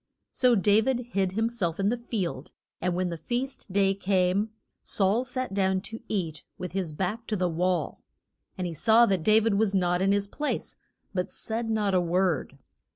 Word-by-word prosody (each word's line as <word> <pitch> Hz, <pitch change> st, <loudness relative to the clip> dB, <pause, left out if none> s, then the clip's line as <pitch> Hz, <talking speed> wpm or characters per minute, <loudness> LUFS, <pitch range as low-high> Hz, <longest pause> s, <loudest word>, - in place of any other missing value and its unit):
So 250 Hz, -2 st, +4 dB
Da 205 Hz, +1 st, +4 dB
vid 255 Hz, +2 st, 0 dB
hid 190 Hz, -3 st, 0 dB
him 225 Hz, +3 st, +1 dB
self 195 Hz, -8 st, -2 dB
in 195 Hz, +1 st, +2 dB
the 240 Hz, -, +1 dB
field; 220 Hz, -7 st, -4 dB, 0.3 s
and 180 Hz, 0 st, 0 dB
when 180 Hz, 0 st, 0 dB
the 170 Hz, -, -4 dB
feast 245 Hz, -, -4 dB
day 195 Hz, 0 st, +3 dB
came 195 Hz, +1 st, +1 dB, 0.3 s
Saul 205 Hz, +5 st, +1 dB
sat 255 Hz, -3 st, -4 dB
down 190 Hz, -1 st, +2 dB
to 225 Hz, +3 st, -7 dB
eat 165 Hz, -7 st, -3 dB
with 180 Hz, -, -5 dB
his 185 Hz, -3 st, -2 dB
back 190 Hz, +8 st, -3 dB
to 215 Hz, -, -1 dB
the 185 Hz, -2 st, +1 dB
wall. 175 Hz, -1 st, -1 dB, 0.6 s
And 185 Hz, -, -2 dB
he 170 Hz, -, -3 dB
saw 225 Hz, +8 st, +5 dB
that 190 Hz, -5 st, +1 dB
Da 215 Hz, +6 st, +5 dB
vid 220 Hz, -2 st, +1 dB
was 210 Hz, -3 st, +2 dB
not 180 Hz, -1 st, +2 dB
in 195 Hz, +1 st, +3 dB
his 200 Hz, 0 st, +2 dB
place, 295 Hz, +9 st, -3 dB, 0.4 s
but 180 Hz, -2 st, -1 dB
said 225 Hz, +1 st, -2 dB
not 210 Hz, -3 st, +1 dB
a 180 Hz, -, +4 dB
word. 175 Hz, -5 st, 0 dB
195 Hz, 195 wpm, -27 LUFS, 180-220 Hz, 0.6 s, saw